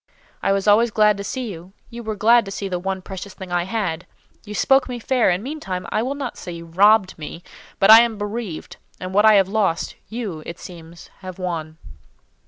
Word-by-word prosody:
I - - +1
was 195 +1 0
always 220 +3 +5
glad 210 -1 +3
to 200 - -5
see 245 +2 -4
you; 180 +2 -11 0.2
you 235 0 -7
were 220 -2 -4
glad 230 +3 +5
to - - -7
see 195 0 -4
the 180 -2 -3
one 190 0 -4
precious 190 +1 -8
thing 190 -2 -9
I 175 0 0
had. 185 -5 -3 0.4
You 210 0 -7
spoke 270 +4 +3
me 245 - -4
fair; 245 -1 +1
and, 180 +3 0
meantime, 215 - -5
I 215 - +1
will 260 +4 -2
not 275 -4 -5
say 180 - -7
you 170 0 -8
robbed 190 +2 +3
me, 165 +3 -8 0.3
but 195 - +6
I 225 +1 +11
am 235 -2 0
bereaved, 205 -4 -5 0.2
and 185 0 -6
what 205 +2 +4
I 215 -1 +7
have 195 -2 +4
lost, 195 -5 -1
you, 215 -9 -5
it 170 - -7
seems, 170 -1 -12
have 185 -2 -9
won." 165 -4 -4
195 Hz, 215 wpm, -21 LUFS, 180-220 Hz, 0.4 s, I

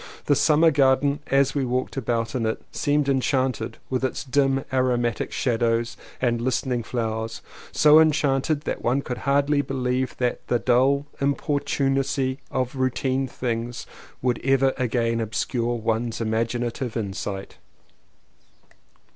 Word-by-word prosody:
The 145 - +3
summer 160 +3 +4
garden 140 +1 +3
as 135 0 +3
we 140 - 0
walked 125 0 -2
about 115 -3 -1
in 115 -3 0
it 110 - -2
seemed 145 -1 +1
enchanted 130 -3 0
with 130 0 -2
its 130 - -2
dim 135 0 +1
aromatic 120 -3 0
shadows 115 -1 0 0.2
and 120 -2 0
listening 125 0 0
flowers 110 -1 -3 0.2
— - - -15
so 150 +1 +6
enchant 145 -3 +2
ed 150 -2 +1
that - - -4
one 130 +4 +1
could 125 -1 -5
hardly 145 +1 +3
believe 130 -2 -2
that 125 -1 -2
the 120 - +2
dull 130 +4 +2
importunacy 135 -1 0
of 130 -1 -1
the 135 - -9
routine 130 +1 0
of 130 - -11
things 120 -1 -3 0.4
would 125 -2 0
ever 135 0 +3
again 115 -2 0
obscure 120 +2 -1
one's 115 0 -1
imaginative 115 +2 -2
insight. 100 -2 -5
130 Hz, 140 wpm, -24 LUFS, 120-135 Hz, 0.4 s, so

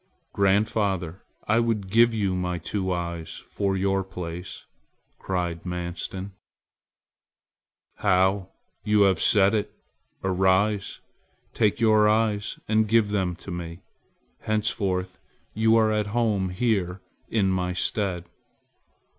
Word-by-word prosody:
"Grandfather, 100 -3 +1 0.3
I 110 +2 +3
would 110 -5 -1
give 115 +2 +5
you 100 -4 0
my 90 -1 -2
two 95 +2 -3
eyes 85 -2 -4
for 100 -1 -1
your 95 0 +1
place!" 90 -1 -7 0.5
cried 90 -3 -3
Manstin. 90 +2 -5 1.7
"How! 95 -1 +2 0.3
you 105 -1 +4
have 95 -4 +2
said 100 -1 +4
it. 105 -2 -1 0.5
Arise. 95 +2 +1 0.5
Take 105 -3 +2
out - - -12
your 110 -2 +5
eyes 105 -1 0
and 110 0 +2
give 110 -1 +3
them 95 -4 0
to 95 - -6
me. 85 +1 -6 0.6
Henceforth 95 -4 -1 0.3
you 110 +1 +3
are 110 -1 +4
at 105 -1 0
home 105 -4 0
here 95 -2 -1 0.3
in 100 -4 +1
my 90 -1 -1
stead." 90 -2 -2
95 Hz, 115 wpm, -25 LUFS, 90-105 Hz, 1.7 s, give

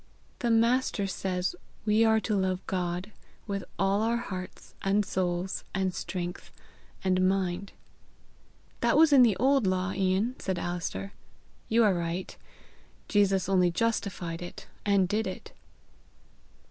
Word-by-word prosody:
"The 240 - 0
Master 230 -2 +2
says 190 - -2 0.3
we 215 +1 +4
are 220 -1 +4
to 215 - -1
love 190 -1 -1
God 180 +2 -2 0.3
with 200 -2 -3
all 195 +1 +2
our 230 +1 +1
hearts 185 -6 -7
and 200 +1 +2
souls 180 0 -2
and 190 -1 0
strength 175 -1 -5 0.5
and 185 0 +3
mind." 190 0 -1 1.1
"That - - +3
was 315 -1 +6
in 270 - +8
the 225 -6 +5
old 265 -2 +3
law, 185 0 0
Ian," 195 +5 +1
said 190 -2 -2
Alister. 165 - -4 0.6
"You 230 +1 +4
are 205 -3 +4
right. 170 +1 -3 0.7
Jesus 195 -3 +3
only 185 -2 +4
justified 180 -4 -2
it 175 - -8 0.2
and 200 -2 +4
did 215 +4 0
it." - - -7
195 Hz, 135 wpm, -28 LUFS, 180-215 Hz, 1.1 s, in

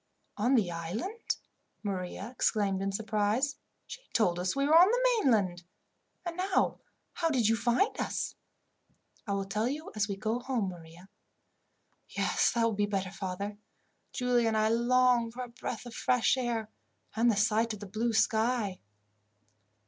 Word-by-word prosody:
"On 245 +6 +2
the 200 -8 +2
island!" 210 - -3 0.5
Maria 195 +2 -4
exclaimed 200 -5 0
in 195 0 -1
surprise. 220 +7 0 0.3
"She - - -9
told 180 -6 +2
us 180 +5 -1
we 275 0 +1
were 305 +3 +4
on 350 +3 +9
the - - +3
mainland. 200 - +2 0.6
And 345 0 -4
now, 375 +1 +1 0.3
how 330 -2 0
did 250 -8 +2
you 225 - +4
find 240 - +1
us?" - - -2 0.9
"I 200 - 0
will 195 0 -1
tell 210 +4 -1
you 295 +5 -4
as 215 0 +1
we 200 - -3
go 220 +3 -1
home, 245 -6 -1
Maria." 170 +1 -12 1.0
"Yes, - - +1
that 235 -1 +1
will 230 -1 +2
be 205 0 0
better, 195 -2 -2
father. 200 +1 -5 0.5
Giulia 245 -2 +1
and 220 -1 +1
I 215 0 +3
long 240 0 +3
for 250 +2 -6
a 245 - -8
breath 235 0 -6
of 240 - -8
fresh 250 +1 +2
air, 235 -4 -2 0.4
and 235 +2 +3
the 215 - +2
sight 220 +2 +2
of 210 - -8
the 205 - -7
blue 225 +4 -1
sky." 220 -2 +1
225 Hz, 165 wpm, -30 LUFS, 200-250 Hz, 1.0 s, on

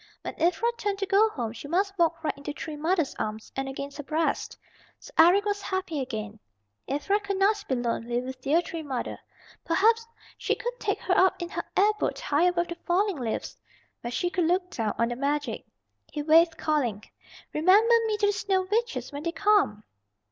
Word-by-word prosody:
When - - -4
Ivra 360 +8 +2
turned 405 -1 -1
to 395 - -1
go 405 +3 +4
home 235 - -4
she 235 +4 -9
must 390 +5 0
walk 335 -2 +1
right 310 - -1
into 280 +1 -6
Tree 310 +1 -6
Mother's 320 0 0
arms 215 0 -4
and 270 0 -2
against 280 +1 -6
her 295 - -5
breast. 315 +3 -1 0.4
So - - -13
Eric 360 +5 +6
was 410 -1 -1
happy 375 -6 -2
again, 220 -4 -5 0.5
Ivra 295 +10 +1
could 400 -1 -3
not 405 +2 +2
be 260 - +1
lonely 240 0 -1
with 255 +1 -7
dear 310 +6 +2
Tree 330 -1 -5
Mother. 270 -5 -4 0.4
Perhaps 450 +7 +3 0.3
she - - +1
would - - -3
take - - 0
her 370 - +1
up 375 0 +4
in 345 -1 -4
her - - -3
air 410 +2 +5
boat - - -1
high 295 +4 +2
above 350 -1 0
the 345 - -4
falling 380 +1 +2
leaves, 235 -4 -3 0.5
where 240 - -4
she 350 +9 -1
could 355 -2 +1
look 360 +2 +1
down 220 -3 -2
on 230 0 +1
the 240 - -3
magic. 285 +3 -2 0.4
He 295 - -3
waved, 325 +2 +5
calling, 245 -10 0 0.5
"Remember 395 +9 +5
me 430 -1 0
to - - +5
the 410 - +3
Snow 390 -2 0
Witches 465 -3 -1
when 285 0 -6
they 335 +2 -2
come." 345 - +2
330 Hz, 200 wpm, -27 LUFS, 275-390 Hz, 0.5 s, Eric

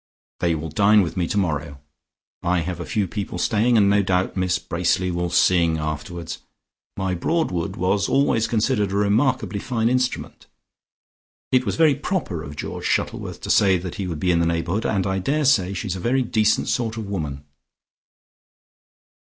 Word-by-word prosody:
They 85 -2 +1
will 80 +1 -5
dine 100 +6 +4
with 85 - -4
me 90 -3 0
tomorrow. 75 -8 -1 0.6
I 90 0 +1
have 90 +2 -4
a - - -6
few 105 -3 0
people 100 -1 -5
staying, 115 +5 +2
and 100 -2 +5
no 100 +1 +4
doubt 95 -1 0
Miss 90 -1 +1
Bracely 90 +1 0
will 85 0 -2
sing 85 -2 +3
afterwards. 75 +2 -5 0.6
My 95 -1 -1
Broadwood 90 - -1
was 95 +2 0
always 135 -5 +2
considered 105 -3 +1
a - - -2
remarkably 105 0 +1
fine 115 0 0
instrument. 125 0 -2 1.0
It 130 0 +2
was - - 0
very 160 -3 +5
proper 145 - -3
of 75 -1 -8
George - - -6
Shuttleworth - - -2
to - - -2
say 95 -2 +4
that 90 0 -6
he 95 - -3
would 85 -4 -4
be 90 +3 +1
in 85 - +2
the 85 - +2
neighbourhood, 85 +5 -1
and 95 -3 0
I 95 0 0
daresay 130 -6 +2
she 105 +3 -4
is 95 - -2
a - - -5
very 130 +7 +1
decent 110 -2 +1
sort 115 -2 -1
of 110 - -4
woman." 75 -8 -4
95 Hz, 175 wpm, -22 LUFS, 85-110 Hz, 1.0 s, and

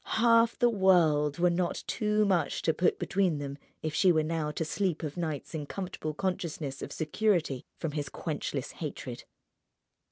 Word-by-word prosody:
Half 230 0 +5
the 245 - +4
world 165 -8 +4
were 175 0 +3
not 175 0 -1
too 210 0 +1
much 185 -4 +1
to 160 - +3
put 180 - +2
between 190 -5 +1
them 140 0 -5 0.2
if 155 -1 -2
she 185 +3 +5
were 160 -2 +3
now 155 -1 -1
to 155 +2 -2
sleep 175 0 -1
of 150 -2 -4
nights 160 -5 -4
in 150 -3 -4
comfortable 180 -5 -4
consciousness 160 -6 -3
of - - -6
security 160 - 0
from 160 - -3
his 145 -1 -3
quenchless - - -4
hatred. - - -6
165 Hz, 165 wpm, -30 LUFS, 150-190 Hz, 0.2 s, Half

